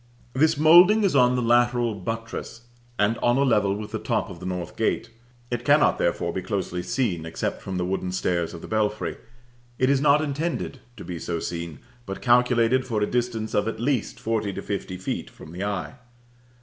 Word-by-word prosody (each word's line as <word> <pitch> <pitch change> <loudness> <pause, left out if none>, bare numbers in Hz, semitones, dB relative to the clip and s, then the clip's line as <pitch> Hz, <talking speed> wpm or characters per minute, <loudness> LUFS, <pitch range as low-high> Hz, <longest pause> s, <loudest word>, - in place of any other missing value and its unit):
This 155 +3 +3
moulding 175 +8 +7
is 195 -7 +2
on 125 -1 +5
the 125 - 0
lateral 120 0 +3
buttress, 115 +3 -6 0.4
and 105 +3 +1
on 120 +1 +2
a 140 - +3
level 105 -7 +2
with 105 0 -7
the - - -3
top - - -1
of 85 - -10
the 90 - -6
north 90 -2 -4
gate; 115 +1 -1 0.4
it 120 -1 -2
cannot 145 +3 +4
therefore - - 0
be 95 - -2
closely 95 -2 -3
seen 95 -6 -1
except 80 0 -4
from 95 -1 -4
the 90 - -1
wooden 95 0 -2
stairs 85 -2 -1
of 85 - -9
the - - -9
belfry; 105 -1 -1 0.6
it 130 +1 +3
is 140 -1 +2
not 145 0 +5
intended 150 -1 -3 0.2
to - - -9
be 85 -2 -5
so 85 0 -3
seen, 85 -2 -5 0.3
but 95 - -5
calculated 125 0 +3
for 110 -5 -1
a - - +3
distance 120 -2 -2
of, 105 +1 +1
at 115 - -3
least, 125 -1 -1
forty 110 -3 -1
to - - -6
fifty 100 -2 -4
feet 95 - -4
from 80 - -13
the 90 +3 -5
eye. 100 -3 -3
115 Hz, 200 wpm, -25 LUFS, 95-125 Hz, 0.6 s, moulding